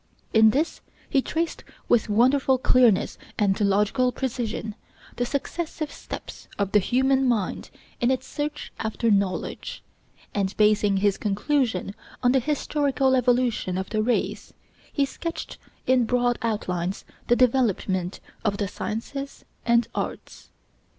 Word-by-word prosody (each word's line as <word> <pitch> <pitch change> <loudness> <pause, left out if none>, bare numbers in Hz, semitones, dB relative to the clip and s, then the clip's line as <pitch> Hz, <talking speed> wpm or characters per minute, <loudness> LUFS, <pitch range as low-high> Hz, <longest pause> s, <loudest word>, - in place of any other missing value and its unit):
In 220 0 +7
this 295 +9 0 0.3
he 270 - +4
traced 330 +4 -2 0.2
with 230 -2 +3
wonderful 260 +5 +4
clearness 245 -5 +3 0.2
and 200 -2 +1
logical 210 +6 +2
precision 235 -4 -3 0.4
the 245 0 0
successive 310 +2 -3
steps - - -9
of 200 -1 -1
the 210 - +5
human 265 +6 +2
mind 220 -6 -1 0.3
in 240 - +2
its 260 -1 0
search 295 0 -4
after 220 +1 0
knowledge, 200 -2 -1 0.5
and 195 -1 -1
basing 210 -2 +4
his 200 0 +2
conclusion 215 -1 0 0.3
on 245 - +5
the 265 - +4
historical 280 -1 +1
evolution 245 -7 +1
of 190 0 -4
the 215 -1 +1
race, 240 +3 -1 0.4
he 280 - +2
sketched 330 +4 -6 0.3
in 255 -2 +4
broad 245 0 +1
outlines 190 -5 -2 0.2
the 240 - +5
development 210 -7 +1 0.2
of 205 -2 0
the 200 - -1
sciences 275 +8 -5 0.2
and 235 -1 +4
arts. - - -5
240 Hz, 130 wpm, -25 LUFS, 205-265 Hz, 0.5 s, In